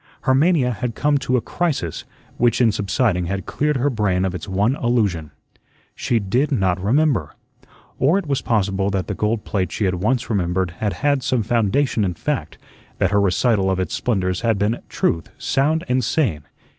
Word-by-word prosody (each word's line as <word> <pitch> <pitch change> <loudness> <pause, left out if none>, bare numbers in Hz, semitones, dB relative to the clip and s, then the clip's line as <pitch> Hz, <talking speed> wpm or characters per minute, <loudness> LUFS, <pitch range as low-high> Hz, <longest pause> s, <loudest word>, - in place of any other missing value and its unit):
Her 130 - +2
mania 140 -2 +3
had 115 0 -4
come 145 -1 +2
to 130 -2 0
a - - 0
crisis, 135 - -2 0.3
which 120 -1 +2
in 120 -3 +4
subsiding 100 -3 0
had 95 +2 -3
cleared 150 -1 0
her 140 +3 +1
brain 95 -5 0
of 95 - -2
its 90 +1 -6
one 100 +7 +1
illusion. 105 -11 0 0.6
She 120 - 0
did 120 +9 0
not 95 -7 0
remember. 120 - +1 0.6
Or 150 +9 +3
it 200 - -2
was 140 -3 -1
possible 100 -3 0
that 95 -2 -1
the 100 - -3
gold 105 +2 -1
plate 95 -4 -1
she 105 - -1
had 90 -1 -1
once 125 +4 0
remembered 95 -4 0
had 105 -2 0
had 140 -2 +3
some 120 -2 0
foundation 115 +2 +1
in 90 -3 -1
fact, - - -3 0.4
that 95 - +1
her 100 -1 +3
recital 100 0 +2
of 95 -1 0
its 95 - -2
splendors 95 -6 -1
had 115 -3 +1
been 105 +4 0
truth, 80 -2 -1
sound 155 +4 +1
and 125 +1 +1
sane. 110 - 0
110 Hz, 185 wpm, -21 LUFS, 95-130 Hz, 0.6 s, in